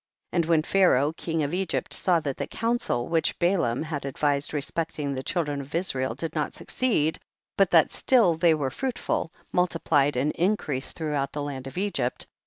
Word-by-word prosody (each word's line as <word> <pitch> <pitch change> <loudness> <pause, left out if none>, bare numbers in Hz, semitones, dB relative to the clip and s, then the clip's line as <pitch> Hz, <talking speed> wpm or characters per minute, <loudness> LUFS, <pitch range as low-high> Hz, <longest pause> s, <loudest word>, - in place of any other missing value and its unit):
4. - - -2
And 170 - +3
when 165 -2 +3
Pharaoh 160 -6 +3
king 165 -1 -2
of 145 +3 -3
Egypt 190 +1 -1
saw 175 -3 +3
that 140 -3 -3
the - - -3
counsel 230 - -1
which 165 -1 0
Balaam 170 -9 +1
had 155 -3 -4
advised 140 +1 0
respecting 150 -1 -2
the 130 - -3
cliildren 145 -3 -1
of 140 +3 -8
Israel 130 -9 -1
did 160 +3 -4
not 150 -2 -2
succeed, 160 -12 0 0.4
but 195 -2 +3
that 165 -3 +5
still 235 -10 +4
they 165 0 +3
were 140 -3 -2
fruitful, 245 - -2 0.2
mul 180 0 +3
tiplied 145 -4 +1
and 135 +4 +1
increased 165 -8 0
throughout 145 -4 -2
the 145 - -3
land 135 -2 -5
of 135 - -9
Egypt, 180 -11 -1
5. - - -21
155 Hz, 190 wpm, -26 LUFS, 140-175 Hz, 0.4 s, that